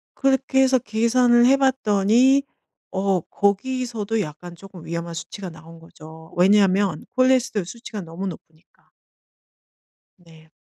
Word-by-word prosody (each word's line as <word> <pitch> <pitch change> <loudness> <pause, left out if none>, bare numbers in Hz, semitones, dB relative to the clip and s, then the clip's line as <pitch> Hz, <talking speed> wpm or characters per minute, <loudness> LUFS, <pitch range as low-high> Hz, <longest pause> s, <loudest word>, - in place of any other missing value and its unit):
그렇게 270 0 +1
해서 260 0 +4
계산을 240 +2 +2
해 270 +2 +5
봤더니 260 0 +3 0.5
어 190 -1 0
거기서도 225 +3 -2
약간 170 +1 -8
쪼끔 185 -2 -13
위험한 170 0 -5
수치가 185 +3 -7
나온 165 0 -14
거죠, 160 0 -15
왜냐하면 195 -2 +3
콜레스테롤 255 -6 +2
수치가 215 +1 -8
너무 170 +3 -6
높으니까. 160 -1 -13 1.3
네. 160 -3 -20
200 Hz, 280 characters per minute, -22 LUFS, 170-245 Hz, 1.3 s, 해